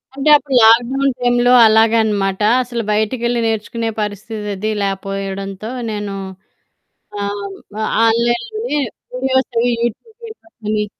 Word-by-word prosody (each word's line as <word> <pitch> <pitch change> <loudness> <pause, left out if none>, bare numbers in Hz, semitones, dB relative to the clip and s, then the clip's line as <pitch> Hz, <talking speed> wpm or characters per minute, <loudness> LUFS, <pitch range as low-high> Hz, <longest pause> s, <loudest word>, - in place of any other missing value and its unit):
అంటే 280 +2 0
అప్పుడు 280 -2 0
లాక్‌డౌన్ 245 +5 +4
టైంలో 245 0 +2
అలాగనమాట. 220 -3 +2 0.2
అసలు 240 -1 -4
బయటికెళ్ళి 235 +3 0
నేర్చుకునే 225 +1 -2
పరిస్థితది 210 0 -4
లేపోయడంతో 195 +1 -4 0.2
నేను 205 -2 -4 1.1
ఆహ్, 200 0 -4 0.3
ఆహ్, - - -1 0.2
ఆన్‌లైన్‌లోనే 295 - 0 0.4
వీడియోస్ 260 0 0
అవి, 245 +1 +2
యూట్యూబ్ 240 - -4
వీడియోస్ 440 -7 -15
అని 210 -1 0
225 Hz, 105 wpm, -17 LUFS, 205-245 Hz, 1.1 s, లాక్‌డౌన్